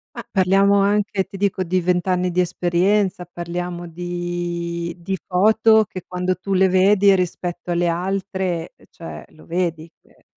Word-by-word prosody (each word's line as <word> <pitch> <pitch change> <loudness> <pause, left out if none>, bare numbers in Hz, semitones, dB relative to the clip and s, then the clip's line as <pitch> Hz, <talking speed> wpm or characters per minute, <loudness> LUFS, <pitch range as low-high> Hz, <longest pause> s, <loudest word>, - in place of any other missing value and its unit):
Ma - - -6
parliamo 195 +1 +3
anche, 200 -1 +1
ti 195 +1 -11
dico, 195 -1 0
di 185 +1 0
20 180 0 0
anni 180 0 +1
di 180 +1 +2
esperienza, 180 +2 +1
parliamo 175 0 -5
di 175 0 -4
di 190 +3 -3
foto 220 +3 +4
che 185 -3 -8
quando 180 0 -1
tu 190 +3 -4
le 190 0 +4
vedi 195 +1 +4
rispetto 175 -1 -3
alle 175 0 +1
altre, 185 -1 -2 0.2
cioè, 165 - -9
lo 155 - -18
vedi 170 -2 -2
che - - -28
180 Hz, 150 wpm, -21 LUFS, 175-195 Hz, 0.2 s, foto